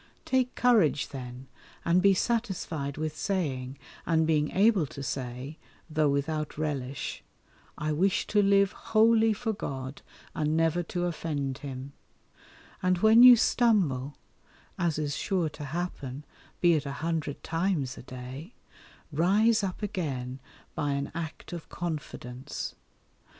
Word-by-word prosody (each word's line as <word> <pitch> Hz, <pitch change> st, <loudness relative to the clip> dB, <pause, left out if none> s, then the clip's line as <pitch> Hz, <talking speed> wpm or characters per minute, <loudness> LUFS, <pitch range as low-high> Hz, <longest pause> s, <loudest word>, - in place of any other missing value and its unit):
Take 255 Hz, -1 st, +1 dB
courage 215 Hz, -, +3 dB
then, 125 Hz, -1 st, -8 dB, 0.4 s
and 170 Hz, +2 st, +4 dB
be 195 Hz, 0 st, +5 dB
satisfied 180 Hz, -, -1 dB
with 155 Hz, 0 st, -3 dB
saying, 140 Hz, -6 st, -2 dB, 0.3 s
and 160 Hz, -1 st, +2 dB
being 150 Hz, -2 st, +2 dB
able 200 Hz, -5 st, +3 dB
to 140 Hz, +1 st, -8 dB
say, 130 Hz, +3 st, -5 dB, 0.3 s
though 155 Hz, -1 st, +2 dB
without 150 Hz, +2 st, -1 dB
relish, 140 Hz, -4 st, -3 dB, 0.5 s
"I 155 Hz, +1 st, -1 dB
wish 185 Hz, +6 st, +2 dB
to 210 Hz, -, +3 dB
live 200 Hz, 0 st, +4 dB
wholly 225 Hz, +1 st, +3 dB
for 220 Hz, +1 st, -1 dB
God 130 Hz, -8 st, -5 dB, 0.3 s
and 155 Hz, 0 st, 0 dB
never 165 Hz, +1 st, +2 dB
to 175 Hz, +1 st, -2 dB
offend 145 Hz, -6 st, -3 dB
Him;" 135 Hz, 0 st, -7 dB, 0.9 s
and 185 Hz, 0 st, +2 dB
when 220 Hz, +5 st, +6 dB
you 250 Hz, 0 st, +11 dB
stumble, 175 Hz, -, +2 dB, 0.6 s
as 170 Hz, -4 st, 0 dB
is 150 Hz, -2 st, -1 dB
sure 180 Hz, -3 st, 0 dB
to 150 Hz, -, -8 dB
happen 145 Hz, -3 st, -4 dB, 0.4 s
(be 175 Hz, -1 st, +6 dB
it 150 Hz, -3 st, 0 dB
a 140 Hz, -, -3 dB
hundred 160 Hz, -4 st, -2 dB
times 165 Hz, -6 st, -1 dB
a -, -, -9 dB
day), 130 Hz, -, -9 dB, 0.6 s
rise 205 Hz, +8 st, +3 dB
up 190 Hz, +2 st, -3 dB
again 135 Hz, -11 st, -3 dB, 0.3 s
by 145 Hz, -1 st, -1 dB
an 140 Hz, 0 st, -2 dB
act 165 Hz, +1 st, -6 dB
of 170 Hz, -2 st, -7 dB
confidence. 140 Hz, -6 st, -5 dB
155 Hz, 135 wpm, -28 LUFS, 140-190 Hz, 0.9 s, you